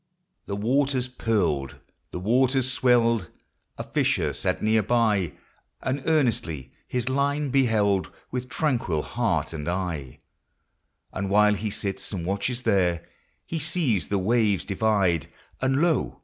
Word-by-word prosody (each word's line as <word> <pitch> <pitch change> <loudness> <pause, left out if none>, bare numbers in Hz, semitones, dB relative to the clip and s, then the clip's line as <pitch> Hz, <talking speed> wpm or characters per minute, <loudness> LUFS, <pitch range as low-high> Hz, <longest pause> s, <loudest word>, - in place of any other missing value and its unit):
The 100 - -3
waters 130 +4 +1
purled, 90 - -1 0.3
the - - -6
waters 130 +6 +2
swelled, 120 -3 +2 0.2
— - - -48
A - - -4
fisher - - 0
sat - - -1
near 110 +1 +3
by, 105 -5 +1 0.5
And 130 +2 -2
earnestly 105 - 0 0.2
his 125 -1 -2
line 140 +1 0
beheld 110 -8 +2 0.2
With 125 0 -4
tranquil 120 - 0
heart - - -1
and 75 -1 -4
eye; 85 -8 -3 1.0
And 95 +1 -3
while 105 +1 +5
he 105 +1 -2
sits 100 -1 -3
and 90 -5 -4
watches 100 +7 -1
there, 90 -6 +1 0.4
He 165 - -3
sees 155 - 0
the 100 - 0
waves 105 0 +1
divide, 95 -6 +1 0.3
And, 135 +1 +2
lo 165 -6 0
110 Hz, 135 wpm, -25 LUFS, 95-130 Hz, 1.0 s, while